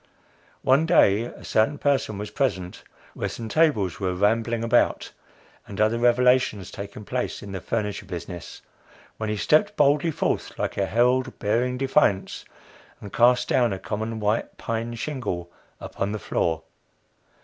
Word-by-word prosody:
One 140 +5 +4
day 115 - +4
a - - -11
certain 110 +7 +1
person 140 -8 0
was 105 +1 -6
present 95 -9 -2 0.3
where - - -3
some 115 - -6
tables 140 - +2
were 95 -2 -1
rambling 115 +4 +1
about, 115 +1 +2 0.6
and 100 - -8
other 110 +2 +2
revolutions 120 -5 +3
taking 100 +1 -8
place 125 -1 -3
in 100 - -8
the 95 -2 -5
furniture 105 -1 -3
business, 85 0 -8 0.5
when 110 -1 -3
he 105 - -1
stepped 205 - +2
boldly 145 0 +3
forth 160 - -2
like - - -2
a 100 - 0
herald 125 +3 +1
bearing 125 +5 0
defiance, 130 -7 +1 0.5
and 100 - -10
cast 125 +1 +4
down 120 -3 +2
a 95 - -2
common 110 +3 -4
white 105 +2 -1
pine 115 +1 -3
shingle 115 - -4 0.3
upon 100 +2 -4
the - - -2
floor. 85 -4 -1
115 Hz, 150 wpm, -24 LUFS, 100-125 Hz, 0.6 s, One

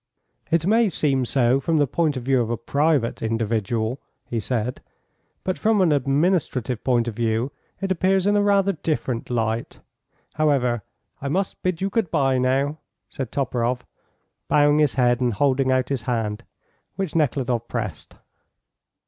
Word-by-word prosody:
"It 165 0 +2
may 220 +2 +4
seem 135 -6 0
so 125 +1 +2
from 160 +4 0
the 145 - +4
point 150 +1 0
of 125 - -5
view 130 0 +2
of 115 - -2
a 120 - -1
private 140 +1 0
individual," 115 +2 -1 0.3
he 115 - -3
said, 120 +2 -2 0.6
"but 185 - -2
from 220 -1 +2
an 180 -4 +4
administrative 140 - +1
point 120 -2 +2
of 120 - -2
view 115 +3 0 0.3
it 195 -1 -1
appears 190 +1 +2
in 205 0 +3
a 205 - +4
rather 200 -1 +3
different 145 -8 -3
light. 115 -1 -2 0.5
However, 135 -7 +1 0.4
I 140 - -3
must 190 +6 -2
bid 185 -2 -1
you 195 - -1
good 220 -6 0
bye, 135 -3 +2
now," 135 +4 +1 0.3
said 130 -4 -5
Toporoff, 125 -2 -1 0.6
bowing 145 0 +4
his 150 -3 +2
head 125 -1 +2
and 120 -2 +1
holding 135 +1 +2
out 130 -1 +1
his 135 -4 -1
hand, 115 -1 -2 0.5
which 195 -5 -3
Nekhludoff 130 -6 0
pressed. 105 -10 -5
135 Hz, 155 wpm, -23 LUFS, 120-155 Hz, 0.6 s, may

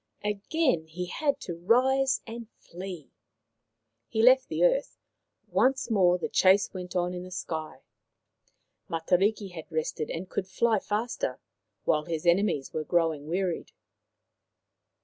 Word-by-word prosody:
Again 210 - 0
he 180 +3 -5
had 280 - -1
to 175 - -5
rise 260 +9 +3
and 230 0 -8
flee. 180 -3 -9 1.0
He 220 - 0
left 260 +2 +6
the - - -1
earth; - - +2 0.5
once 255 +6 +2
more 180 -4 +4
the - - -3
chase 195 +2 +4
went 180 -1 -7
on 180 0 0
in 180 - -5
the 180 - -9
sky. 160 -4 -5 1.1
Matariki 190 +5 +1
had 170 0 -9
rested 155 -1 -2
and 175 +3 -4
could 185 - -3
fly 225 +2 +2
faster, 210 - -2 0.5
while 150 -1 +2
his 165 0 -4
enemies 170 -6 +2
were 155 - -2
growing 160 -2 0
wearied. 180 +1 -2
185 Hz, 130 wpm, -28 LUFS, 170-230 Hz, 1.1 s, left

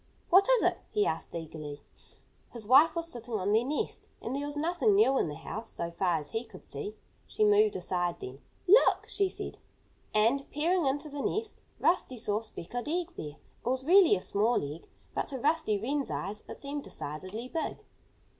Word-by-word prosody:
"What 385 +6 +7
is - - +5
it?" - - +2
he 420 -1 +1
asked - - -3
eagerly. 155 -3 -7 0.7
His 235 -3 -7
wife 275 +10 +6
was 335 0 -1
sitting 240 -7 -5
on 200 0 0
their 220 +2 +4
nest. 290 +4 -3
And 245 - -4
there 285 +1 -2
was 290 0 -5
nothing 350 +7 +2
new 395 -10 +5
in - - +1
the 150 - -5
house, 220 +9 -6
so 170 0 -4
far 175 -1 +1
as 150 -2 -7
he 225 +1 -2
could 220 -6 -14
see. 175 +10 -6 0.3
She 435 - 0
moved 420 0 +5
aside 175 -1 -1
then. 130 +2 -8 0.3
"Look!" 420 +7 +6
she 395 -2 0
said. - - -7 0.5
And, 230 +6 +2
peering 330 +2 +1
into 285 +3 -1
the 290 -1 -5
nest, 430 +8 -2 0.2
Rusty 335 -7 +1
saw 210 -1 +1
a - - -11
speckled 225 - -6
egg 350 +2 -1
there. 150 -1 -6 0.3
It - - -1
was 260 +1 -1
really 360 - +7
a 185 - -4
small 215 +1 +2
egg. 165 - -14 0.2
But - - -1
to 275 - -4
Rusty 290 -6 +1
Wren's 275 +7 -1
eyes 205 +3 -4
it - - -6
seemed 285 0 -5
decidedly 185 +11 -5
big. 325 +4 -4
250 Hz, 195 wpm, -30 LUFS, 200-325 Hz, 0.7 s, What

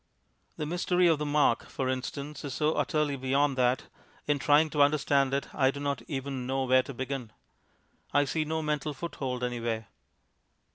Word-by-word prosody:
The 150 - -2
mystery 180 +2 +1
of 165 -3 +4
the 150 - -2
mark, 145 -5 +2
for 130 - -2
instance, 140 +3 -4
is 140 -3 -4
so 155 +1 +2
utterly 150 -2 0
beyond 135 +1 +1
that, 125 0 +2 0.4
in 145 -1 +1
trying 150 +2 +4
to 150 - +1
understand 140 -2 +3
it, 140 +1 -2
I 135 -2 +3
do 140 - -4
not 140 -1 -2
even 135 -3 -4
know 135 0 0
where 130 0 +4
to 135 +2 -8
begin. 130 -3 -4 0.8
I 145 0 +3
see 155 +4 0
no 160 +1 -2
mental 150 -1 -2
foothold 130 -4 -4
anywhere. 115 -3 -2
140 Hz, 175 wpm, -29 LUFS, 130-150 Hz, 0.8 s, of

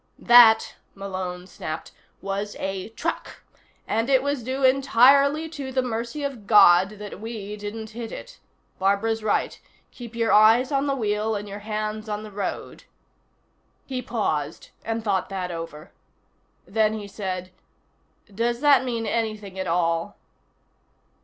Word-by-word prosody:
"That," 235 -2 +6 0.2
Malone 185 -2 -5
snapped, 155 -3 -7 0.3
"was 200 +1 -3
a 195 +1 -4
truck. 225 - -5 0.4
And 225 +4 0
it 265 -1 +4
was 285 -2 -1
due 260 +3 -3
entirely 275 +3 +4
to 280 -4 -6
the 260 0 0
mercy 235 +4 -4
of 255 -8 -5
God 195 -1 +6
that 205 -1 -8
we 215 -2 -6
didn't 210 +1 -7
hit 230 0 -7
it. - - -10 0.4
Barbara's 200 +4 +1
right. 210 - -1 0.3
Keep 235 -2 -10
your 230 -1 +1
eyes 225 +6 +5
on 275 0 +1
the 275 - +1
wheel 215 -2 -1
and 205 0 -5
your 200 +1 -7
hands 215 +1 -4
on 210 0 -3
the 215 - -10
road." 200 0 -5 1.0
He 255 -2 -4
paused 165 - -3
and 225 0 -3
thought 195 -4 0
that 185 -2 -4
over. 165 0 -8 0.7
Then 220 +1 +1
he 210 -2 -6
said: 185 -2 -5 0.8
"Does 235 +3 -1
that 290 -3 +5
mean 235 -3 -3
anything 215 -3 -3
at 190 - -3
all?" 165 +2 0
215 Hz, 140 wpm, -24 LUFS, 195-240 Hz, 1.0 s, That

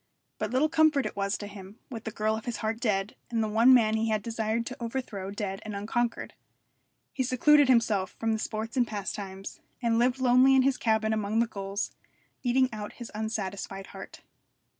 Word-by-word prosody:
But - - -1
little 260 +5 +2
comfort 310 -3 +3
it - - -4
was 200 +1 -1
to 205 - -7
him, 200 0 -10
with 225 -3 -7
the 220 - -3
girl 215 +1 0
of 220 - -7
his 240 - -3
heart 220 +1 -1
dead, 205 -3 0
and 230 -2 0
the - - 0
one 225 +4 +5
man 225 -4 +5
he 220 +1 0
had 215 -2 0
desired 225 0 -1
to 255 - -6
overthrow 225 -6 -4
dead 200 -1 -4
and 215 -2 -6
unconquered. 230 +4 -2 0.8
He 265 - -2
secluded 275 +3 +5
himself 225 -7 +2
from 225 0 0
the 220 - -1
sports 220 +1 -4
and 245 -2 +2
pastimes, 195 -2 -5 0.2
and 230 -2 +1
lived 250 +2 +2
lonely 255 +1 +5
in 260 - +5
his 270 -1 +2
cabin 220 -1 +1
among 215 0 -1
the 230 - +4
gulls, 200 -2 -4 0.5
eating 255 +1 +3
out 210 -1 -6
his 240 -2 -9
unsatisfied 200 -3 -4
heart. - - -10
220 Hz, 195 wpm, -28 LUFS, 205-245 Hz, 0.8 s, one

